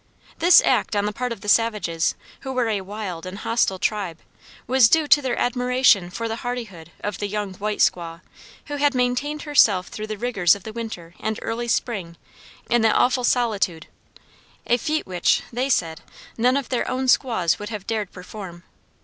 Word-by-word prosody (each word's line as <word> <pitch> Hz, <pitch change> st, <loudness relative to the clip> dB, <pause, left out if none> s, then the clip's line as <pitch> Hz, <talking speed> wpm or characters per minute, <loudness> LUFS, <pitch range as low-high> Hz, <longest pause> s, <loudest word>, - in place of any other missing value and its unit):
This 350 Hz, +2 st, +7 dB
act -, -, +1 dB
on 205 Hz, 0 st, +1 dB
the 210 Hz, -, -2 dB
part 250 Hz, +2 st, -3 dB
of 225 Hz, -4 st, -6 dB
the -, -, -9 dB
savages, 210 Hz, -7 st, +1 dB, 0.2 s
who 265 Hz, -, -6 dB
were 250 Hz, -3 st, 0 dB
a 205 Hz, -3 st, -1 dB
wild 190 Hz, -3 st, -6 dB
and 185 Hz, +2 st, -7 dB
hostile 225 Hz, -4 st, 0 dB
tribe, 195 Hz, -4 st, -2 dB, 0.5 s
was 255 Hz, -2 st, +5 dB
due 320 Hz, +2 st, +4 dB
to 290 Hz, -, +6 dB
their 260 Hz, -3 st, -2 dB
admiration 250 Hz, -6 st, +2 dB
for 230 Hz, +5 st, -4 dB
the 225 Hz, 0 st, -3 dB
hardihood 220 Hz, -10 st, -6 dB
of 205 Hz, -2 st, -3 dB
the 205 Hz, -, -2 dB
"young 205 Hz, -1 st, -3 dB
white 210 Hz, +2 st, -3 dB
squaw," 170 Hz, -1 st, 0 dB, 0.4 s
who 290 Hz, -, -5 dB
had 285 Hz, -1 st, +2 dB
maintained 250 Hz, +5 st, -1 dB
herself 210 Hz, -11 st, +3 dB
through 215 Hz, 0 st, -6 dB
the 215 Hz, -1 st, -5 dB
rigors 200 Hz, -7 st, +2 dB
of 200 Hz, -, -11 dB
the 220 Hz, -, -8 dB
winter 215 Hz, -8 st, -7 dB
and 220 Hz, 0 st, -2 dB
early 235 Hz, +1 st, -3 dB
spring 195 Hz, -8 st, -2 dB, 0.5 s
in 240 Hz, -1 st, +2 dB
that 220 Hz, -1 st, +3 dB
awful 250 Hz, 0 st, +2 dB
solitude 210 Hz, -10 st, 0 dB, 0.8 s
a 240 Hz, -, +3 dB
feat 310 Hz, +4 st, -2 dB
which, 180 Hz, -2 st, +1 dB
they 255 Hz, +3 st, -1 dB
said, 165 Hz, -10 st, 0 dB, 0.3 s
none 250 Hz, +3 st, +2 dB
of 280 Hz, -, -4 dB
their 250 Hz, -, -1 dB
own 260 Hz, +1 st, -2 dB
squaws 205 Hz, -, +2 dB
would 205 Hz, 0 st, -6 dB
have 210 Hz, -4 st, -6 dB
dared 215 Hz, -4 st, -3 dB
perform. 180 Hz, -2 st, -10 dB
220 Hz, 185 wpm, -23 LUFS, 190-250 Hz, 0.8 s, This